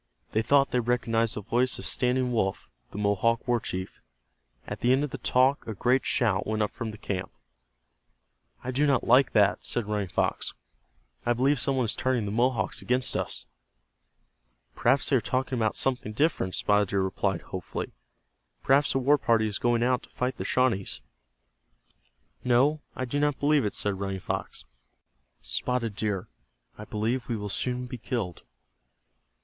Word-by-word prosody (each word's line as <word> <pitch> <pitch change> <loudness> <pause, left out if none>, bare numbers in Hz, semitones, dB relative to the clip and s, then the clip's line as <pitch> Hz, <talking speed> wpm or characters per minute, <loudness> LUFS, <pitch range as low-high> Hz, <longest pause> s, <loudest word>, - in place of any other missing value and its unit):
They 110 - +2
thought 140 +4 +3
they 125 - +2
recognized 115 -1 +1
the 105 - -4
voice 125 +5 +1
of - - -8
Standing 125 0 +1
Wolf, 95 -5 -1 0.2
the - - -9
Mohawk 105 +4 +1
war 120 -1 +2
chief. 95 -3 -6 0.6
At - - -6
the 120 - +2
end 135 +2 +3
of 150 - -3
the 135 - -6
talk 130 +3 +2
a 110 - -4
great 125 +6 +2
shout 105 -6 +1
went 110 0 0
up 105 - -2
from 115 -4 -5
the 110 - -8
camp. 95 -3 -4 1.3
"I 130 - -3
do 145 +4 +2
not 135 -3 +2
like 130 +3 +4
that," 100 -2 +3
said 120 - -1
Running 105 -2 -2
Fox. - - -1 0.7
"I 120 - +2
believe 135 +3 +2
some 135 +3 +2
one 130 - +2
is 110 - 0
turning 130 -4 0
the 100 - -3
Mohawks 120 0 0
against 125 +1 0
us." - - -3 1.3
"Perhaps 135 - +2
they 135 - +4
are - - 0
talking 130 +1 -1
about 110 -3 0
something 125 -5 0
different," 140 - 0
Spotted 105 0 +2
Deer 100 +1 0
replied, 95 +1 -1
hopefully. 95 -2 -5 0.7
"Perhaps 140 0 +3
a - - +4
war 140 +3 +3
party 115 -3 +3
is 105 -1 -3
going 120 -1 +2
out 125 +1 +2
to - - -17
fight 125 0 -2
the - - -4
Shawnees." 120 -7 +1 1.4
"No, 135 +5 +3
I 130 - -2
do 145 +4 -2
not 145 -1 +1
believe 145 -3 +3
it," 105 - -2
said 100 -2 -2
Running 95 -1 -3
Fox. - - -4 0.8
"Spotted 110 - -2
Deer, 105 -3 -2 0.5
I 105 - -9
believe 115 +5 -2
we 120 - 0
will 105 -1 -5
soon 125 +4 -2
be 125 0 -7
killed." 105 - -3
120 Hz, 175 wpm, -27 LUFS, 105-130 Hz, 1.4 s, like